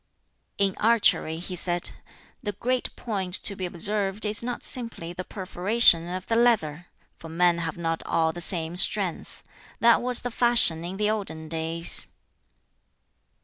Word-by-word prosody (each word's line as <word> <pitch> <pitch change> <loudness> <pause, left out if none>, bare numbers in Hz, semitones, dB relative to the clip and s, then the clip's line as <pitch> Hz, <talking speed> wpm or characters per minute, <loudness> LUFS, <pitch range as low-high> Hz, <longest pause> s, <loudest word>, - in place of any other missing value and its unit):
"In 195 -2 +1
archery," 215 -8 +2
he 180 +2 -6
said, 175 0 +1 0.5
"the 205 -4 -4
great 250 +5 -2
point 190 -6 -2
to 200 - +2
be 185 -1 -4
observed 200 +3 -1
is 210 +1 -1
not 245 0 -5
simply 230 -9 0
the 180 +1 -6
perforation 185 -1 +2
of 185 0 -5
the 225 - -1
leather; 175 -9 +1 0.3
for 165 - -11
men 170 +1 +1
have 165 -1 -4
not 165 -1 -3
all 160 -1 0
the 175 - -7
same 165 -1 -4
strength. 185 -1 0 0.4
That 235 0 +4
was 250 -1 -1
the 245 - -5
fashion 230 -9 +4
in 180 +3 -6
the 210 +1 +1
olden 160 -7 -5
days." 165 +1 +1
185 Hz, 150 wpm, -25 LUFS, 170-215 Hz, 0.5 s, That